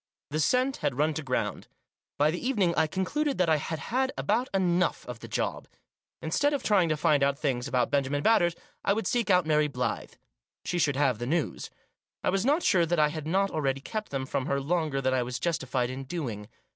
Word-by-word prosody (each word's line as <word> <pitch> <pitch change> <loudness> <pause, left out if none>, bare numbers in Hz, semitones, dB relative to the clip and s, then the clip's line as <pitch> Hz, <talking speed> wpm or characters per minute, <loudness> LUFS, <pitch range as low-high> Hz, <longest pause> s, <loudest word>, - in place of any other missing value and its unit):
The 155 - -1
scent 255 - +2
had 125 - -2
run 155 +2 +2
to 155 - -3
ground. 130 -3 -2 0.5
By 150 +2 +3
the 175 - -5
evening 210 -9 +2
I 160 - +3
concluded 275 - -1
that 180 -2 +2
I 160 - +4
had 160 +2 -4 0.2
had 260 +1 +2
about 235 +5 0
enough 180 -2 +1
of 125 -2 -7
the - - -9
job. - - -2 0.6
Instead 285 - +1
of 280 - -4
trying 190 -6 +3
to 155 - +1
find 150 -1 +3
out 140 0 +2
things 130 -5 -1
about 125 0 0
Benjamin 145 0 0
Batters, 175 -7 +4 0.3
I 200 - +3
would 225 +2 -2
seek 240 -3 0
out 180 -3 +4
Mary 150 -1 +3
Blyth. 125 -2 -3 0.5
She 175 - -1
should 145 -4 +2
have 135 -5 +1
the 120 - -3
good 165 +6 +2
news. 160 - -4 0.5
I - - +2
was 195 +1 +1
not 295 +7 +2
sure 170 -3 +3
that 175 +1 +1
I 150 -1 +4
had 155 0 -6
not 195 +4 +1
already 135 -3 0
kept 215 +9 -5
them 135 -1 -3
from 130 +1 -2
her 140 - +1
longer 150 -1 -1
than 130 -1 +1
I 130 - +2
was 125 0 -3
justified 130 -4 -1
in 135 +1 -6
doing. 125 -10 -4
155 Hz, 220 wpm, -28 LUFS, 135-190 Hz, 0.6 s, I